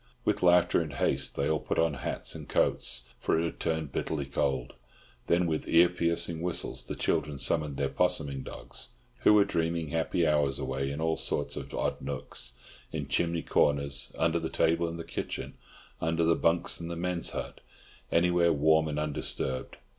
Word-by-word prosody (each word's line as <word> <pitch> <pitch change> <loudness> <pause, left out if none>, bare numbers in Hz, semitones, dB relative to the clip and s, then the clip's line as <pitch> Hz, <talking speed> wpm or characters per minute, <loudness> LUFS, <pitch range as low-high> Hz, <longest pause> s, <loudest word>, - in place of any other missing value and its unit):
With 105 -1 +1
laughter 90 -1 +5
and 75 -3 -5
haste - - 0
they 70 - 0
all 75 0 +1
put - - -3
on 80 -2 +3
hats 70 - -4
and - - -9
coats, - - +1 0.2
for - - +1
it - - +1
had 85 - -5
turned 80 -3 -1
bitterly 75 -1 -2
cold; 65 -2 -1 0.5
then 85 +1 +3
with 80 -2 -1
ear 85 +1 +6
piercing 85 -1 0
whistles 90 -1 -1
the - - -4
children 75 -2 0
summoned 70 +1 +1
their 70 - +1
'possuming 70 -1 0
dogs, - - -8 0.3
who 105 - +6
were 100 -1 +6
dreaming 85 -4 -1
happy 80 +1 +1
hours 75 -3 +2
away 70 0 -2
in 70 +3 -4
all 80 0 +1
sorts - - -1
of - - -6
odd - - -1
nooks, - - -5 0.4
in 75 -3 -4
chimney 85 +3 +1
corners, 70 -1 +1
under 80 +1 +2
the 80 0 -3
table 85 +1 +2
in 85 - -6
the 85 - -5
kitchen, - - -5 0.5
under 80 +1 +1
the 85 0 +4
bunks 85 +1 +1
in 85 - -5
the 85 - -4
men's 90 0 -1
hut, - - -6 0.5
anywhere 85 0 +4
warm 80 +1 +4
and 75 -1 -3
undisturbed. 70 -3 -2
80 Hz, 180 wpm, -29 LUFS, 70-85 Hz, 0.5 s, ear